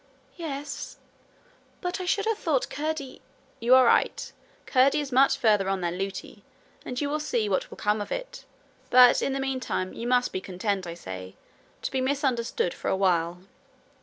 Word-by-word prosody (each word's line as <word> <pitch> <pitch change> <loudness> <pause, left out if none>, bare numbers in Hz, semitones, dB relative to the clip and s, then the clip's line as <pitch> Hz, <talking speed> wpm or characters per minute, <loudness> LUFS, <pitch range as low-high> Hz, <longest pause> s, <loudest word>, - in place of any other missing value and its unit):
'Yes; 290 -4 -6 0.8
but 360 +1 -3
I - - -4
should 405 +3 +1
have 445 -1 0
thought 290 -6 0
Curdie 300 -2 -4 0.2
' - - -34
'You 240 +3 +6
are 260 -1 +7
right. - - +2 0.3
Curdie 270 +3 +4
is 285 -2 -4
much 265 +2 +4
farther 210 -4 +3
on 195 -1 -1
than 175 +1 -2
Lootie, 195 0 -5 0.4
and 250 0 -4
you 290 - 0
will 300 +2 -1
see 235 -7 -1
what 190 -2 -1
will - - -11
come 210 0 0
of 205 - -6
it. - - -5 0.4
But 250 0 +7
in - - 0
the 275 - -2
meantime 260 -8 -2
you 235 - -5
must 250 0 +2
be 185 - -2
content, 190 0 -2
I 170 - -6
say, 95 - -8 0.5
to - - -2
be 265 - 0
misunderstood 260 - 0
for - - -7
a - - +1
while. 175 -2 +1
250 Hz, 185 wpm, -27 LUFS, 195-280 Hz, 0.8 s, are